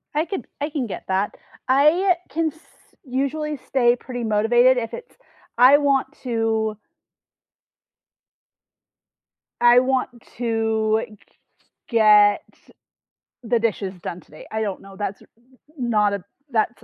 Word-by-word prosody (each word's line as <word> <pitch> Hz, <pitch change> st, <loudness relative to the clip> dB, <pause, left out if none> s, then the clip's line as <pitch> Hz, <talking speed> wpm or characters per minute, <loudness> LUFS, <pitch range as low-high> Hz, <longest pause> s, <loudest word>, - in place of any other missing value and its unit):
I 305 Hz, +2 st, +1 dB
could 345 Hz, -, -5 dB
I 290 Hz, -, -1 dB
can 280 Hz, -6 st, -3 dB
get -, -, -7 dB
that. 190 Hz, +2 st, -1 dB, 0.3 s
I, 305 Hz, +8 st, +4 dB
uh, 350 Hz, +1 st, -18 dB
can 325 Hz, 0 st, 0 dB
s 315 Hz, -, -22 dB, 0.4 s
usually 280 Hz, +3 st, -2 dB
stay 245 Hz, -2 st, +2 dB
pretty 245 Hz, -1 st, -7 dB
motivated 240 Hz, +4 st, +3 dB
if 230 Hz, -2 st, -3 dB
it's 485 Hz, -, -9 dB, 0.4 s
I 255 Hz, +4 st, +7 dB
want 275 Hz, -2 st, +1 dB, 0.2 s
to 225 Hz, -3 st, -1 dB, 2.8 s
I 240 Hz, 0 st, +7 dB
want 260 Hz, 0 st, 0 dB, 0.3 s
to 220 Hz, -2 st, 0 dB
g 215 Hz, -, -16 dB, 0.7 s
get 210 Hz, -3 st, +5 dB, 1.0 s
the 235 Hz, 0 st, +1 dB
dishes 210 Hz, -4 st, -2 dB
done 175 Hz, 0 st, -6 dB
today, 155 Hz, -, -15 dB
I 220 Hz, 0 st, -2 dB
don't 200 Hz, -3 st, -3 dB
know. 195 Hz, 0 st, -13 dB
That's 200 Hz, -1 st, -5 dB
r -, -, -19 dB, 0.5 s
not 215 Hz, -5 st, +1 dB
a 200 Hz, -3 st, -4 dB, 0.3 s
that's 235 Hz, +1 st, -1 dB
235 Hz, 130 wpm, -22 LUFS, 215-265 Hz, 2.8 s, I